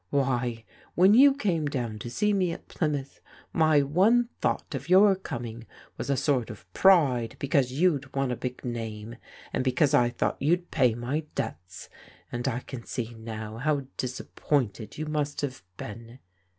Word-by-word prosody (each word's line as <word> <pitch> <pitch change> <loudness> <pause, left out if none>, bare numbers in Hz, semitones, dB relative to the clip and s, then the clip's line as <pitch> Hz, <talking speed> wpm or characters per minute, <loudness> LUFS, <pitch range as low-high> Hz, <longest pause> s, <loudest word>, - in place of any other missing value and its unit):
Why, 125 -4 0 0.3
when 190 +4 +6
you 275 +4 +7
came 175 - 0
down 120 -6 -3
to 120 - -6
see 210 - +1
me 185 -3 +1
at - - -11
Plymouth, 145 -4 -3 0.3
my 155 -3 +4
one 210 - +3
thought - - -1
of - - -5
your 195 +2 +7
coming 120 -9 -7 0.3
was - - -5
a 140 - +2
sort 130 -6 +1
of 100 -5 -10
pride 140 -12 +4
because 135 -2 +1
you'd 145 -2 +1
won 135 -2 0
a - - -1
big 125 +1 -6
name, 115 -1 -5 0.4
and - - 0
because 130 +3 +2
I 125 -4 +4
thought - - -2
you'd 175 +5 +1
pay 125 -6 +3
my 130 +6 -2
debts, 90 - -5 0.4
and 120 +2 -3
I 125 -1 -1
can 125 -3 -8
see 120 -1 -4
now 110 -1 -7
how 145 +2 0
disappointed 125 -3 -2
you 155 - -3
must 150 -1 -2
have 130 -8 -4 0.2
been. 115 +3 -9
135 Hz, 165 wpm, -27 LUFS, 120-155 Hz, 0.4 s, you